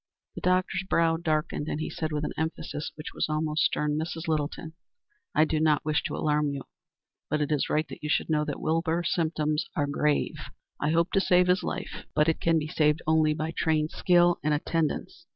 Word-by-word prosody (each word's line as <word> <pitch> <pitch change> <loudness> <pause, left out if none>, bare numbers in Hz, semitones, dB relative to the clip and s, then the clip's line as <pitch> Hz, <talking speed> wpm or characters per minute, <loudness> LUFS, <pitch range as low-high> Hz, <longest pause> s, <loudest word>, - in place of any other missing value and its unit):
The - - -8
doctor's 185 +1 +1
brow 165 -1 +3
darkened, 155 -2 -1
and 150 - -2
he 155 - -3
said 155 -1 -3
with 150 0 -2
an - - -3
emphasis 160 -1 -3
which 155 - -8
was - - -1
almost 155 0 0
stern: 150 0 0
"Mrs. 165 +1 -4
Littleton, 155 +1 -2 0.6
I 155 - +5
do 155 0 0
not 155 -2 +2
wish 155 -1 +1
to - - -2
alarm 150 -1 +1
you, 140 -1 -4 0.7
but 150 - 0
it 150 0 -1
is 150 - +1
right 155 +1 +1
that - - -10
you 150 - -4
should - - +1
know 155 -1 +1
that 145 - -4
Wilbur's 165 +1 0
symptoms 155 -2 0
are 145 -4 +1
grave. 145 +1 0 0.4
I 150 - 0
hope 170 +2 +2
to 195 - +3
save 180 -1 +4
his 180 +1 +3
life, - - -5
but 150 +1 +3
it 165 - +1
can 165 -1 +3
be 155 -1 -1
saved 155 -1 +1
only 155 -1 +3
by 155 +1 -2
trained 155 -1 +1
skill 175 -1 +3
and 150 0 +2
attendance. 165 +2 -2
155 Hz, 205 wpm, -27 LUFS, 150-165 Hz, 0.7 s, I